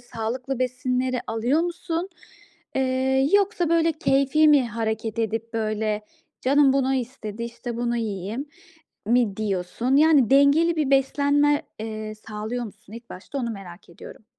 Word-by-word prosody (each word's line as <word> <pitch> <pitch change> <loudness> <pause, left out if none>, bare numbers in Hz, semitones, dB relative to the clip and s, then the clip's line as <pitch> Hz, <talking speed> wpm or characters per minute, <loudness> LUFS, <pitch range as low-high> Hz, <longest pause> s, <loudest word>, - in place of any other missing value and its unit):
sağlıklı 245 +3 -4
besinleri 255 0 -1
alıyor 235 +8 +1
musun? 345 +1 -3 0.7
Eee, 265 +1 +1
yoksa, 400 -3 +2
böyle, 330 0 +3
keyfi 275 +1 +3
mi 280 -5 +4
hareket 220 0 -3
edip 225 +1 -2
böyle, 215 -1 -1 0.4
"Canım 275 +1 +4
bunu 270 -1 +1
istedi, 235 -4 -5
işte, 235 0 -6
bunu 240 0 -1
yiyeyim." 215 +4 -4 0.6
mi 230 -3 +2
diyorsun? 215 +5 -1
Yani, 295 -5 +5
dengeli 285 +5 +4
bir 300 -3 0
beslenme, 285 +2 +3 0.2
eee, 215 -1 -5
sağlıyor 220 +3 -5
musun 210 0 -13
ilk 235 +1 -11
başta 205 +9 -7
onu 235 -2 -2
merak 190 -5 -10
ediyorum. 205 +5 -13
250 Hz, 135 wpm, -24 LUFS, 220-275 Hz, 0.7 s, Yani